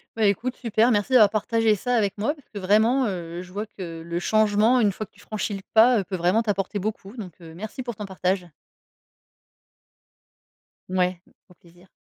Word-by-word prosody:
Bah 220 Hz, -1 st, +2 dB
écoute, 235 Hz, +6 st, 0 dB
super. 230 Hz, 0 st, +2 dB
Merci 210 Hz, +4 st, 0 dB
d'avoir 220 Hz, -5 st, +7 dB
partagé 220 Hz, +1 st, +1 dB
ça 245 Hz, +5 st, -1 dB
avec 205 Hz, -4 st, 0 dB
moi 220 Hz, +8 st, 0 dB
parce 290 Hz, -4 st, -21 dB
que 210 Hz, -, -9 dB
vraiment, 220 Hz, +7 st, +3 dB
heu, 175 Hz, -3 st, -5 dB
je 180 Hz, -, -14 dB
vois 210 Hz, +3 st, -4 dB
que 170 Hz, -6 st, -8 dB
le 170 Hz, +1 st, -3 dB
changement, 215 Hz, +5 st, +3 dB
une 210 Hz, -4 st, +3 dB
fois 215 Hz, +3 st, -6 dB
que -, -, -32 dB
tu 200 Hz, -, -24 dB
franchis 210 Hz, 0 st, -4 dB
le 195 Hz, -, -5 dB
pas, 225 Hz, -1 st, +6 dB
peut 190 Hz, -, -4 dB
vraiment 180 Hz, +5 st, +2 dB
t'apporter 205 Hz, -2 st, -2 dB
beaucoup. 205 Hz, +1 st, -5 dB
Donc, 190 Hz, -7 st, -7 dB
merci 180 Hz, +10 st, -8 dB
pour 240 Hz, -2 st, -5 dB
ton 210 Hz, -, -6 dB
partage. 185 Hz, -1 st, -1 dB, 2.4 s
Ouais, 180 Hz, -1 st, 0 dB, 0.3 s
au -, -, -17 dB
plaisir. 175 Hz, +2 st, -21 dB
205 Hz, 185 wpm, -24 LUFS, 185-225 Hz, 2.4 s, d'avoir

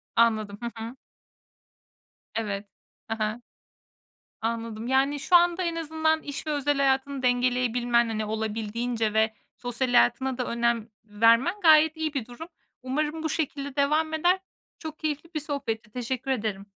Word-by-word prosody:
Anladım, 215 Hz, -3 st, +2 dB
hı 235 Hz, 0 st, -3 dB
hı. 235 Hz, +3 st, -7 dB, 1.4 s
Evet. 205 Hz, -2 st, -2 dB, 0.5 s
Hı 225 Hz, -, -1 dB
hı. 215 Hz, +3 st, -2 dB, 1.0 s
Anladım. 230 Hz, 0 st, -3 dB
Yani 275 Hz, +2 st, +2 dB
şu 355 Hz, -, +3 dB
anda 345 Hz, +1 st, +4 dB
en 335 Hz, -1 st, -1 dB
azından 315 Hz, 0 st, 0 dB
iş 285 Hz, +2 st, -6 dB
ve -, -, 0 dB
özel 290 Hz, -1 st, +1 dB
hayatını 270 Hz, 0 st, +1 dB
dengeleyebilmen 245 Hz, -1 st, +2 dB
hani 220 Hz, -1 st, -2 dB
olabildiğince 220 Hz, +1 st, -2 dB
ve 220 Hz, 0 st, +2 dB, 0.2 s
sosyal 245 Hz, +1 st, -2 dB
hayatına 260 Hz, -, +3 dB
da 250 Hz, -, -1 dB
önem 235 Hz, -1 st, 0 dB, 0.2 s
vermen 230 Hz, -, +4 dB
gayet 315 Hz, -1 st, +6 dB
iyi 315 Hz, -2 st, -2 dB
bir 270 Hz, -6 st, -2 dB
durum. 245 Hz, +8 st, -9 dB, 0.4 s
Umarım 300 Hz, +4 st, -2 dB
bu 315 Hz, -, 0 dB
şekilde 285 Hz, -2 st, -3 dB
devam 305 Hz, +3 st, +2 dB
eder. 350 Hz, +4 st, +3 dB, 0.4 s
Çok 315 Hz, -1 st, -7 dB
keyifli 310 Hz, +1 st, -3 dB
bir 310 Hz, -, -1 dB
sohbetti. 250 Hz, -7 st, -4 dB
Teşekkür 255 Hz, +2 st, -3 dB
ederim. 210 Hz, -5 st, -2 dB
255 Hz, 145 wpm, -26 LUFS, 225-300 Hz, 1.4 s, gayet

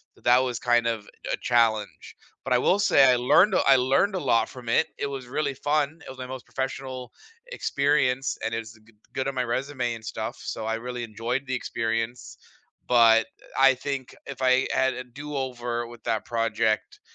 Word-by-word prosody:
So -, -, -23 dB
that 125 Hz, +2 st, +5 dB
was 125 Hz, -2 st, -3 dB
kind 120 Hz, -1 st, +2 dB
of 110 Hz, -3 st, -2 dB, 0.2 s
a -, -, 0 dB
challenge, 110 Hz, -7 st, 0 dB, 0.3 s
but 135 Hz, -, -6 dB
I -, -, +5 dB
will 185 Hz, +10 st, +2 dB
say 170 Hz, -8 st, +5 dB
I 125 Hz, -1 st, +6 dB
learned 170 Hz, -, +4 dB
a -, -, +4 dB
I 135 Hz, -, +8 dB
learned 135 Hz, +11 st, +2 dB
a -, -, 0 dB
lot 115 Hz, -1 st, +3 dB
from 125 Hz, -2 st, -11 dB
it, 160 Hz, -, +3 dB
it -, -, -2 dB
was 135 Hz, -3 st, -6 dB
really 140 Hz, +1 st, -1 dB
fun. 145 Hz, +3 st, -1 dB
It -, -, -10 dB
was 130 Hz, -, -9 dB
my 130 Hz, -, -6 dB
most 130 Hz, -2 st, -8 dB
professional 130 Hz, -1 st, -5 dB, 0.4 s
experience, 140 Hz, -, +1 dB
and 115 Hz, 0 st, -2 dB
is 115 Hz, 0 st, -5 dB
a 110 Hz, -, -21 dB
g 110 Hz, +1 st, -23 dB, 0.2 s
good 135 Hz, 0 st, -2 dB
on 135 Hz, -, -6 dB
my 125 Hz, -, 0 dB
resume 125 Hz, 0 st, -2 dB
and 110 Hz, -, -11 dB
stuff, -, -, -4 dB
so 110 Hz, -, -5 dB
I 110 Hz, 0 st, -1 dB
really 120 Hz, +1 st, -5 dB
enjoyed 115 Hz, +5 st, -3 dB
the 130 Hz, -, -3 dB
experience, 115 Hz, 0 st, -3 dB, 0.5 s
but, 115 Hz, -1 st, +5 dB
eh, -, -, -18 dB, 0.3 s
I -, -, -2 dB
think, 135 Hz, 0 st, -5 dB
if 135 Hz, -1 st, -8 dB
I 130 Hz, 0 st, +3 dB
had 130 Hz, 0 st, +2 dB
a 125 Hz, -, -5 dB
do-over 125 Hz, -3 st, -4 dB
with 120 Hz, -1 st, -13 dB
that 110 Hz, -, -1 dB
project, 115 Hz, -2 st, -1 dB
125 Hz, 205 wpm, -26 LUFS, 115-135 Hz, 0.5 s, I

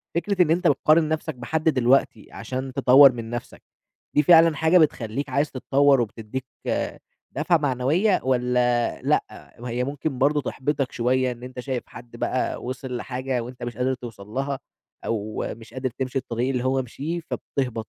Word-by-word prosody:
فكرة 185 Hz, +2 st, +1 dB
إن 160 Hz, -, +4 dB
أنت 175 Hz, +2 st, +2 dB
بتقارن 155 Hz, +3 st, +4 dB
نَفْسك 160 Hz, -2 st, -2 dB
بحد 160 Hz, +6 st, 0 dB
دلوقتي، 130 Hz, -1 st, +2 dB
عشان 130 Hz, 0 st, -5 dB
تطوِّر 135 Hz, 0 st, +7 dB
من 115 Hz, -2 st, -7 dB
نَفْسك، 120 Hz, 0 st, -6 dB, 0.5 s
دي 150 Hz, -, +5 dB
فعلًا 165 Hz, -1 st, +6 dB
حاجة 160 Hz, +5 st, +4 dB
بتخلِّيك 140 Hz, -4 st, +1 dB
عايز 140 Hz, +3 st, 0 dB
تتطوَّر 135 Hz, 0 st, +3 dB
وبتدِّيك 115 Hz, +3 st, -5 dB, 0.9 s
دفعة 160 Hz, +4 st, +2 dB
معنوية، 150 Hz, -, +1 dB
والّا 125 Hz, -2 st, +1 dB
لأ؟ -, -, -2 dB
وهي 120 Hz, +1 st, -2 dB
ممكن 140 Hz, 0 st, -3 dB
برضه، 145 Hz, +2 st, +3 dB
تحبِّطك 135 Hz, +1 st, -2 dB
شوية، 125 Hz, +1 st, +1 dB
إن 120 Hz, 0 st, -10 dB
أنت 125 Hz, 0 st, -8 dB
شايف 130 Hz, -1 st, -3 dB
حد 120 Hz, 0 st, -12 dB
بقى، 125 Hz, +2 st, -2 dB
وصل 125 Hz, 0 st, -5 dB
لحاجة، 130 Hz, 0 st, -3 dB
وأنت 125 Hz, +1 st, -9 dB
مش 120 Hz, -2 st, -5 dB
قادر 130 Hz, +1 st, +1 dB
توصَل 115 Hz, -6 st, -9 dB
لها، 135 Hz, +5 st, -3 dB, 0.5 s
أو 110 Hz, -1 st, -2 dB
مش 115 Hz, 0 st, -14 dB
قادر 130 Hz, 0 st, -2 dB
تمشي 130 Hz, +2 st, -4 dB
الطريق 120 Hz, +1 st, -2 dB
اللي 125 Hz, -2 st, -1 dB
هو 130 Hz, 0 st, +1 dB
مشيه، 150 Hz, +8 st, -4 dB
فبتهبِط؟ 125 Hz, -8 st, -4 dB
130 Hz, 160 wpm, -24 LUFS, 120-145 Hz, 0.9 s, تطوِّر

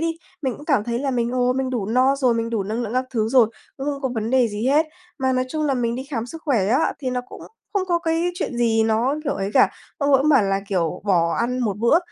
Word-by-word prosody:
đi, 330 Hz, 0 st, 0 dB, 0.3 s
mình 260 Hz, -3 st, -1 dB
cũng 295 Hz, -, -12 dB
cảm 275 Hz, -10 st, +2 dB
thấy 235 Hz, 0 st, -2 dB
là 275 Hz, 0 st, -1 dB
mình, 240 Hz, -1 st, 0 dB
ồ, 250 Hz, 0 st, +2 dB
mình 260 Hz, 0 st, -2 dB
đủ 225 Hz, -6 st, -2 dB
no 255 Hz, +4 st, +3 dB
rồi, 255 Hz, -4 st, +2 dB
mình 230 Hz, 0 st, -2 dB
đủ 225 Hz, -4 st, 0 dB
năng 220 Hz, +5 st, -3 dB
lượng 225 Hz, 0 st, -4 dB
các 255 Hz, +1 st, +1 dB
thứ 220 Hz, -3 st, 0 dB
rồi, 240 Hz, -3 st, +5 dB, 0.3 s
cũng 270 Hz, +1 st, -5 dB
không 280 Hz, -1 st, -2 dB
có 265 Hz, -, +1 dB
vấn 220 Hz, +1 st, -2 dB
đề 255 Hz, -3 st, +3 dB
gì 210 Hz, +3 st, -3 dB
hết. 300 Hz, +4 st, +3 dB, 0.3 s
Mà 260 Hz, 0 st, +1 dB
nói 255 Hz, 0 st, +1 dB
chung 310 Hz, +2 st, -2 dB
là 275 Hz, -, +1 dB
mình 235 Hz, -2 st, -1 dB
đi 260 Hz, +2 st, -5 dB
khám 235 Hz, -3 st, -2 dB
sức 325 Hz, +4 st, -9 dB
khỏe 240 Hz, -, +2 dB
á, 260 Hz, +7 st, +2 dB
thì 260 Hz, -3 st, -3 dB
nó 250 Hz, 0 st, -1 dB
cũng -, -, -11 dB, 0.3 s
không 385 Hz, -2 st, 0 dB
có 345 Hz, -1 st, +2 dB
cái 335 Hz, +1 st, 0 dB
chuyện 310 Hz, -9 st, -3 dB
gì 225 Hz, -2 st, +2 dB
nó, 225 Hz, +5 st, +1 dB
kiểu, 280 Hz, -, 0 dB
ấy 195 Hz, 0 st, -3 dB
cả, -, -, +5 dB, 0.3 s
ông 285 Hz, -1 st, +1 dB
ấy 270 Hz, -, +5 dB
bảo 270 Hz, -7 st, +5 dB
là, 195 Hz, 0 st, 0 dB
kiểu, 180 Hz, -2 st, -1 dB
bỏ 170 Hz, -4 st, +2 dB
ăn 250 Hz, +2 st, -1 dB
một 210 Hz, -5 st, -1 dB
bữa 235 Hz, +9 st, +4 dB
250 Hz, 280 wpm, -22 LUFS, 225-275 Hz, 0.3 s, rồi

